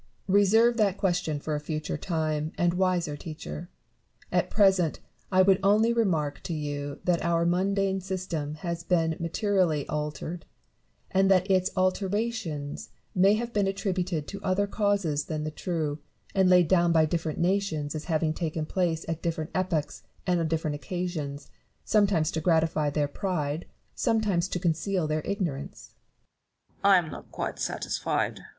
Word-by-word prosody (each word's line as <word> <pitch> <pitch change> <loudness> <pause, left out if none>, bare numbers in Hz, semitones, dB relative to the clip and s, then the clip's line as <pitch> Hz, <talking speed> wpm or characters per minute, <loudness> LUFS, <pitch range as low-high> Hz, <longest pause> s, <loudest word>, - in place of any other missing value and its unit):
Reserve 215 +4 +4
that 200 -3 +2
question 175 -6 0
for 155 +1 -3
a 150 - 0
future 155 +1 -3
time 155 -2 -2
and 175 0 +2
a - - -4
■wiser 180 -5 +1
teacher. 155 +2 -7 0.6
At - - +1
present, 190 -6 +3 0.3
I 185 0 +6
would 190 0 +4
only 215 +4 +4
remark 165 -11 0
to 170 - -2
you 145 -1 -4
that 175 -2 +1
our 170 0 +2
mundane 190 +2 +1
system 180 -5 -3
has 170 +1 -4
been 165 -2 +1
materially 170 -3 +1
altered; 150 +3 -4 0.7
and 195 0 +3
that 190 0 +3
its 185 0 +3
alterations 185 - -1 0.2
may 195 +3 +5
have 235 +2 -3
been 205 -2 +2
attributed 185 -5 -2
to 200 -1 -7
other 190 +1 +1
causes 200 -8 0
than 155 -1 -3
the 155 - -3
true, 155 -3 -2 0.3
and 190 -2 +4
laid 180 -2 +6
down 175 -1 +4
by 160 -1 +5
difierent 160 -1 -2
nations 170 -5 0
as 155 -1 -5
having 160 -2 +1
taken 160 -2 -2
place 165 -1 -1
at 165 0 -3
different 160 -2 -2
epochs 160 - -1 0.2
and 180 -2 +2
on 165 - 0
different 160 -1 -1
occasions, 145 -1 -4 0.3
some 210 -2 +4
times 165 -5 +1
to 160 - -2
gratify 160 -2 +2
their 145 0 0
pride, 155 -2 -2 0.3
sometimes 210 -7 +1
to 185 - -3
conceal 175 +1 0
their 155 0 0
ignorance. 170 -9 -4 0.7
Newton. - - -37
I 200 -1 +8
am 165 -3 -1
not - - -10
quite - - -4
satisfied. - - -1
Barrow. - - -13
175 Hz, 160 wpm, -27 LUFS, 155-190 Hz, 0.7 s, I